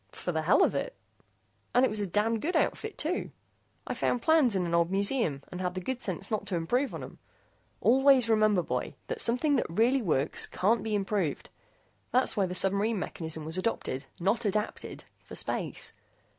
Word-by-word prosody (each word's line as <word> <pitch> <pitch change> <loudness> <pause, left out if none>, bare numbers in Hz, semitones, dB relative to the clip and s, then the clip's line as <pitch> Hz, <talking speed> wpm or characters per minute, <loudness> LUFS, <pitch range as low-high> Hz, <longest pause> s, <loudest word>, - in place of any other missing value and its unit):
"For 180 - -4
the 160 -2 -1
hell 165 +6 +4
of - - +2
it, - - -3 0.8
and 250 +1 +6
it - - +1
was 210 0 -2
a 200 - -1
damned 215 +4 +1
good 350 +4 -1
outfit, 435 -1 0
too. 330 +4 -1 0.6
I - - -3
found 245 - -1
plans 310 -9 +4
in 185 -2 +1
an 170 - -3
old 170 0 +3
museum, 195 - 0
and 180 0 -5
had 180 0 -2
the - - -2
good 255 +7 -4
sense 195 +1 -2
not 210 -2 -2
to 190 - -2
improve 245 +12 0
on - - -6
'em. - - -11 0.6
Always 265 0 +5
remember, 215 -4 +3
boy, - - -3
that 485 -2 -2
something 275 +5 +2
that - - 0
really 235 +10 +2
works 155 - +1
can't 220 +5 +1
be 220 -1 -2
improved. 195 -6 -2 0.6
That's 255 +1 +3
why 195 -3 +1
the 180 - -5
submarine 200 +4 +2
mechanism 160 -4 -4
was 160 +4 -1
adopted 145 - -2
not 200 +7 +1
adapted 210 +1 -3 0.2
for - - -10
space. - - -2
210 Hz, 190 wpm, -29 LUFS, 180-245 Hz, 0.8 s, and